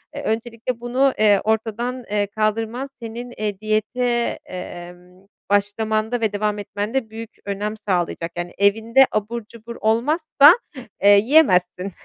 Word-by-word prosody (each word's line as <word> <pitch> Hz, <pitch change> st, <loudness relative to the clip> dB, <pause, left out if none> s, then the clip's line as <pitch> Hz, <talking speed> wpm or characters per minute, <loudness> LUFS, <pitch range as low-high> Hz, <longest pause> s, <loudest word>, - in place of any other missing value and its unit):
Eee, -, -, -5 dB
öncelikle 230 Hz, +1 st, -3 dB
bunu, 255 Hz, +3 st, +1 dB
eee, 205 Hz, -2 st, +4 dB
ortadan, 225 Hz, +3 st, -2 dB
eee, 205 Hz, -1 st, +1 dB
kaldırman, 225 Hz, +5 st, -2 dB
senin, 240 Hz, +2 st, -7 dB
eee, 210 Hz, -2 st, -3 dB
diyete, 235 Hz, +3 st, -1 dB
emm, 180 Hz, +1 st, -10 dB, 0.2 s
başlamanda 215 Hz, +3 st, 0 dB
ve 215 Hz, -2 st, 0 dB
devam 210 Hz, 0 st, -1 dB
etmende 210 Hz, +4 st, -3 dB
büyük 225 Hz, 0 st, -8 dB, 0.2 s
önem 205 Hz, +2 st, -3 dB
sağlayacak. 175 Hz, -4 st, -2 dB
Yani, 175 Hz, 0 st, -4 dB
evinde 225 Hz, +6 st, +4 dB
abur 215 Hz, +1 st, -3 dB
cubur 230 Hz, +1 st, -11 dB
olmazsa, 290 Hz, +7 st, +5 dB, 0.5 s
eee, 200 Hz, 0 st, +7 dB
yiyemezsin. 195 Hz, -, +3 dB
215 Hz, 125 wpm, -21 LUFS, 205-235 Hz, 0.5 s, eee